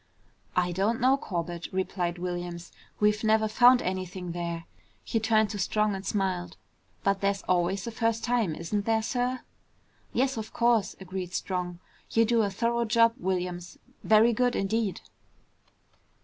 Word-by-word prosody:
"I 180 -1 +2
don't 200 +6 0
know, 260 +2 +4
Corbett," 175 -8 -4
replied 180 -2 -2
Williams. 175 -1 -5 0.3
"We've 210 +1 +2
never 220 0 +3
found 245 +3 +6
anything 185 -1 -4
there." 170 -1 -4 0.4
He 225 - -1
turned 220 -1 +2
to 205 - -5
Strong 210 +1 +1
and 190 0 -5
smiled. 185 -3 -2 0.5
"But 195 0 +1
there's 200 0 0
always 185 +2 0
a 235 - -4
first 225 0 0
time, 235 -9 +1
isn't 200 +6 -3
there, 225 -1 +2
sir?" 250 +2 -1 0.7
"Yes, 265 0 0
of 220 0 -6
course," 235 -4 +2
agreed 185 -1 -5
Strong. 180 -2 -3 0.3
"You 230 0 +3
do 230 0 +3
a 205 - +1
thorough 235 +4 0
job, 230 +1 +4
Williams. 180 -3 -3 0.3
Very 220 +2 +5
good 245 +2 +1
indeed!" 205 0 -1
200 Hz, 150 wpm, -28 LUFS, 180-230 Hz, 0.7 s, found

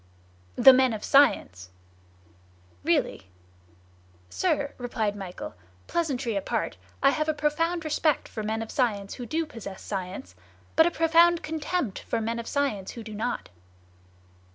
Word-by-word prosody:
"The 265 - +9
men 260 -2 +4
of 210 - -5
science." 95 - +3 1.1
"Really?" - - +4
"Really." 95 - -11 1.0
"Sir," 280 - 0
replied 225 -4 -2
Michel, 190 -3 -7 0.3
"pleasantry 275 -9 -1
apart, 195 - -2 0.3
I 275 - +6
have 305 +1 -1
a 310 - +1
profound 325 +3 0
respect 305 -1 +1
for 220 - -6
men 220 +1 -2
of 225 - -9
science 205 -6 0
who 245 - -7
do 320 +7 -1
possess 225 -9 -9
science, 185 - -5 0.4
but 320 - +6
a - - +3
profound 335 +1 +4
contempt 310 - -2
for - - -2
men 230 +1 -2
of 230 - -6
science 265 -10 -1
who 230 - -8
do 215 -1 -8
not." 225 +4 -3
245 Hz, 145 wpm, -27 LUFS, 210-305 Hz, 1.1 s, The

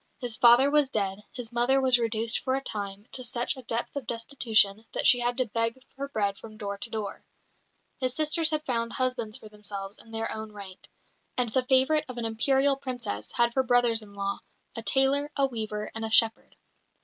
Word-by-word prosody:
His 245 -4 -2
father 245 +4 +6
was 295 -2 +3
dead; 200 -3 -2
his 245 -2 -6
mother 240 +3 +2
was 255 -2 +4
reduced 230 0 0
for 260 -1 -1
a 270 - -3
time 200 -2 -6
to 255 - -1
such 240 0 -1
a 260 - -10
depth 235 +1 -3
of 275 -5 -5
destitution 225 -4 +2
that - - -2
she 250 -3 +7
had 245 0 -1
to 255 - +2
beg 230 +2 -2 0.2
her 280 +1 -5
bread 200 -5 -1
from 215 -1 -12
door 200 -2 -4
to 240 - -4
door. 215 -3 -5 0.8
His 255 -1 0
sisters 315 +1 +1
had 310 -1 -2
found 230 -2 -2
husbands 250 -4 -2
for 215 - -11
themselves 205 -1 -6
in 225 - -16
their 225 0 -2
own 220 -1 -6
rank; 195 -2 -11 0.5
and 245 -3 0
the 260 -1 +1
favourite 265 +4 +3
of 250 - -7
an 235 - -3
Imperial 270 +5 +2
Princess 245 - -5
had 235 0 +2
for 265 - +2
brothers 245 -2 +3
in 205 -1 -13
law 200 0 -3 0.4
a 230 - -2
tailor, 275 +4 +3
a 275 - +3
weaver, 215 -4 -4
and 225 - -4
a 220 - -1
shepherd. 225 0 +5
235 Hz, 205 wpm, -27 LUFS, 215-260 Hz, 0.8 s, she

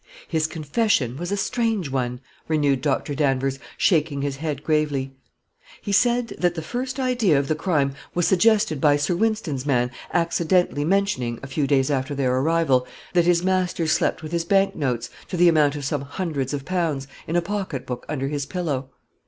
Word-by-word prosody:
"His 160 -2 0
confession 155 - 0
was 175 +6 -5
a 200 - 0
strange 220 - -1
one," 125 -1 -2 0.3
renewed 145 -4 +2
Dr. 145 +1 0
Danvers, 135 -1 0 0.2
shaking 150 -5 +2
his 140 -1 -2
head 150 -1 -4
gravely. 145 -4 0 0.7
"He 205 - -5
said 240 +3 +3
that 175 -1 +1
the 160 - -4
first 255 - -4
idea 245 - +2
of 140 0 0
the 155 - +2
crime 150 -4 0 0.2
was 175 -1 +2
suggested 205 -6 +3
by 145 -1 +5
Sir 145 +5 0
Wynston's 195 -10 -1
man 125 -4 +1 0.2
accidentally 170 -2 +1
mentioning, 165 -11 0
a - - -5
few 140 +1 -1
days 135 0 +2
after 135 +1 -1
their 130 -2 +1
arrival, 135 -2 +2 0.3
that 175 -2 +4
his 175 0 +3
master 185 -2 +1
slept 160 - +1
with 155 - -6
his 170 -1 0
bank 195 +3 +2
notes, 125 -6 -2 0.2
to 180 - -4
the 175 +1 +6
amount 150 -3 +4
of 145 -2 -5
some 145 0 -1
hundreds 140 -2 -3
of 140 -2 -4
pounds, 165 -7 -1 0.2
in 165 - -2
a 175 - +4
pocketbook 170 -11 -4
under 135 -3 -2
his 140 -1 -3
pillow. 145 -8 -3
155 Hz, 180 wpm, -23 LUFS, 135-180 Hz, 0.7 s, the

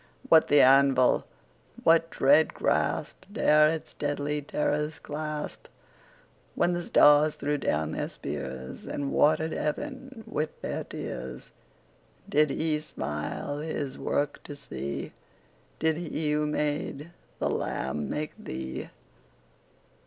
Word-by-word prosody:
What 160 -1 +7
the 145 - +6
anvil? 135 -1 +5 0.6
What 165 0 +5
dread 150 +2 +4
grasp - - 0
15 - - -17
Dare 150 0 +6
its 160 0 -4
deadly 145 0 -2
terrors 150 +1 -1
clasp? 150 0 -5 0.9
When 175 - +2
the 175 - -1
stars 150 -2 +5
threw 145 0 -1
down 80 - 0
their - - -2
spears, 65 -2 -6
And 140 -1 -3
water'd 155 +1 +3
heaven 265 - -4
with 155 +1 -3
their - - -3
tears, 65 -1 -7 0.8
Did 150 0 +3
He 155 +1 0
smile 75 - -4
His 150 -3 -3
work 145 0 -1
to 145 - -7
see? 70 - -5 0.6
Did 160 0 +1
He 160 -3 -2
who 150 0 +1
made 150 +1 -2 0.3
the - - 0
lamb 70 +3 -2
make 150 0 -3
thee? 65 0 -5
150 Hz, 120 wpm, -28 LUFS, 135-155 Hz, 0.9 s, What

